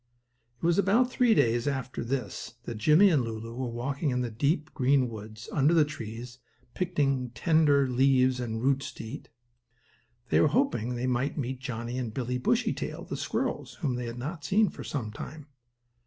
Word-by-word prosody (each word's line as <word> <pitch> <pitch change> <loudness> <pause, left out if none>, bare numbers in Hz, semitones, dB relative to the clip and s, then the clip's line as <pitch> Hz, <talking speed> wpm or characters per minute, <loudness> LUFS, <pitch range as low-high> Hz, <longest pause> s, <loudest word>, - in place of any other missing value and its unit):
It 120 - -5
was 170 +2 +3
about 230 +6 +3
three 245 -3 +4
days 120 -3 +2
after 135 -3 -2
this 120 -3 -4
that 115 -3 -6
Jimmie 155 - +6
and 145 -6 +3
Lulu 115 0 -5
were 125 0 -3
walking 135 +6 -2
in 125 -1 0
the 120 -2 -2
deep, 145 +7 0
green 135 -1 +3
woods, 110 +1 -9
under 150 +4 +4
the 155 -2 +5
trees, 120 -3 -7 0.3
picking 140 -8 0
tender 150 -2 +4
leaves 130 0 +3
and 115 -2 -3
roots 135 +1 +1
to - - -8
eat. 115 +6 -8 1.0
They - - +4
were - - +5
hoping 135 - +1
they 120 +1 -2
might 130 +4 0
meet 130 -2 -3
Johnnie 125 -1 -4
and 120 -3 -3
Billie 125 +1 -2
Bushytail, - - -1
the - - -5
squirrels - - -2
whom 135 - 0
they 120 -1 -3
had 115 +1 -6
not 145 +5 -5
seen 205 +5 +3
for - - -9
some 115 -8 -4
time. 150 +7 -8
130 Hz, 180 wpm, -28 LUFS, 120-150 Hz, 1.0 s, Jimmie